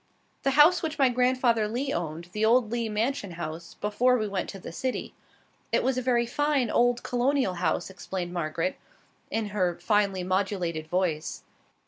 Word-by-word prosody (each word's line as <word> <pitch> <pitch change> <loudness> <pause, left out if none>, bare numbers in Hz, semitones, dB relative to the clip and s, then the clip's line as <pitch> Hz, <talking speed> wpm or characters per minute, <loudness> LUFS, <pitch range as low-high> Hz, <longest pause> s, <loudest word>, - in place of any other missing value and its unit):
"The 275 0 0
house 330 +5 +7
which 315 -1 -3
my 270 -3 +5
grandfather 250 -3 +2
Lee 255 +6 -2
owned, 170 0 -4
the 210 +3 -2
old 225 0 +4
Lee 235 -2 -1
mansion 215 -2 -1
house, 165 0 -6
before 245 +5 +2
we 215 -2 -1
went 195 -2 -3
to 195 - -7
the 185 - -8
city. 255 +9 -3 0.6
It - - +2
was 265 0 +1
a 255 - -1
very 240 -1 +2
fine 280 -1 +1
old 245 0 +2
Colonial 250 -3 +1
house," 175 -2 -1
explained 180 -1 -5
Margaret, 165 +1 -2 0.5
in 220 -2 -2
her 185 -4 0
finely 195 0 +1
modulated 185 -4 -1
voice. 170 -3 -1
210 Hz, 165 wpm, -27 LUFS, 180-250 Hz, 0.6 s, house